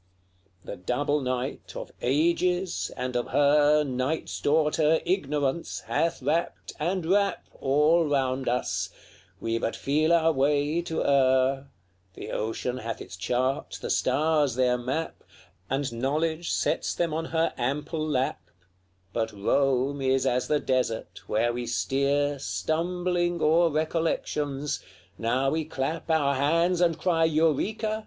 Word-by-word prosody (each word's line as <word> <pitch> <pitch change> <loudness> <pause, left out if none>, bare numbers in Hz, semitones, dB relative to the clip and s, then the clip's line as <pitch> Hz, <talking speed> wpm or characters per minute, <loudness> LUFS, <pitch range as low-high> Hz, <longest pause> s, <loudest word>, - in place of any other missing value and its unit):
LXXXI. - - -27
The - - -6
double 145 +10 0
night 130 0 -3
of - - -6
ages, 170 +6 +1
and 125 0 -3
of 120 - 0
her, 150 +1 +4
Night's 130 +3 -2
daughter, 155 +1 +3
Ignorance, 150 -4 -1
hath 165 -5 -1
wrapt, 160 +5 -1
and 175 +3 -1
wrap 200 +3 +1
All 150 +5 +3
round 135 -3 0
us; 125 +1 -1 0.5
we 115 +2 -1
but 115 - -2
feel 155 +4 +1
our 165 -1 +4
way 145 +3 +1
to 165 -2 -2
err: 135 0 +3 0.5
The - - -7
ocean 115 +3 -2
hath 115 -2 -5
its - - -9
chart, 125 +8 -1
the - - -4
stars 145 0 +2
their 125 -1 +2
map; 130 +7 -3 0.5
And 135 -2 -1
knowledge 155 +7 -1
spreads - - 0
them 170 -3 0
on 165 +1 -2
her 165 0 0
ample 150 +5 -2
lap; 135 -4 -1 0.7
But 115 -1 -1
Rome 135 +6 +1
is 130 0 +2
as 125 0 +1
the 150 - +2
desert, 125 -5 -2
where 115 +3 +1
we 120 0 -4
steer 140 +3 0
Stumbling 175 +3 -1
o'er 165 +2 +4
recollections: 150 -2 -1 0.4
now 130 +4 +1
we 160 +1 0
clap 155 +3 -4
Our 150 -3 +3
hands, 165 +6 +2
and 170 -2 +3
cry, 165 -3 +1
'Eureka!' 165 +8 +1
145 Hz, 135 wpm, -27 LUFS, 130-160 Hz, 0.7 s, her